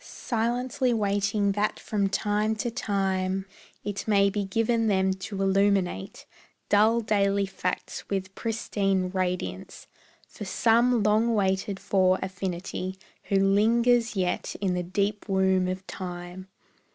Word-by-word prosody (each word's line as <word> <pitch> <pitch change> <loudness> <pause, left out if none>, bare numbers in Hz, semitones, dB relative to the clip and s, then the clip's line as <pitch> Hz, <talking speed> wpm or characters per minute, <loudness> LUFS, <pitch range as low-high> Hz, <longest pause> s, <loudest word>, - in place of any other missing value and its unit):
Silently 245 +1 -1
waiting 200 -1 +1
that 210 +2 -1
from 200 -2 -1
time 210 +2 0
to 230 +2 -3
time 195 -4 -1 0.4
It 205 +1 -4
may 200 -2 +4
be 205 0 -1
given 225 +3 +1
them 190 -2 +2 0.2
to 195 -2 -2
illuminate 195 - +1 0.4
Dull 220 +3 +4
daily 200 -2 +1
facts 185 -1 -4
with 190 -1 -3
pristine 195 -4 -1
radiance 180 - -3 0.4
For - - -9
some 230 +3 +3
long 220 +2 +3
waited 195 0 0
for 185 -1 +2
affinity 185 0 -4 0.3
Who 200 - -1
lingers 225 +4 +3
yet 180 -2 -1
in 190 -2 0
the 180 - -1
deep 200 +4 -2
womb 190 -1 +2
of 185 +1 -4
time. 180 0 -7
200 Hz, 125 wpm, -27 LUFS, 190-215 Hz, 0.4 s, may